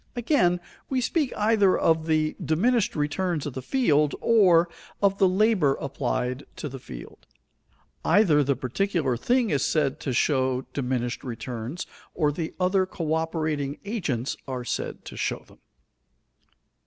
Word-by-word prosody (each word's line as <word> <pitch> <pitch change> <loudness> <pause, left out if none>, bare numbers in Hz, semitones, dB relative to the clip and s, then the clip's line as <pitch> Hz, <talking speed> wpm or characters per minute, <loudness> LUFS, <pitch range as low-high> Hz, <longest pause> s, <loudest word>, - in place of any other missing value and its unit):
Again, 220 - +2 0.3
we 265 - +1
speak 280 +2 0
either 210 -3 +3
of 160 0 +2
the 155 -1 +1
diminished 220 +8 +1
returns 155 +2 -1
of 145 - -4
the 130 - -5
field, 150 - +2
or 180 -7 +5 0.3
of 195 -1 +2
the 190 - +5
labor 185 -7 +3
applied 130 -1 -2
to - - -5
the 135 -1 -7
field. - - -11 0.8
Either 165 -9 +4
the 140 0 +1
particular 140 +2 -1
thing 240 - +1
is 140 -3 +1
said 150 -2 +1
to 135 - -3
show 130 0 +1
diminished 125 -3 -2
returns 120 +5 -5 0.3
or 150 -3 +2
the 160 +2 -5
other 185 +1 +2
coöperating 155 -4 -2
agents 155 - -2
are 130 -2 -4
said - - -4
to - - -8
show - - -2
them. - - -20
155 Hz, 140 wpm, -26 LUFS, 135-195 Hz, 0.8 s, or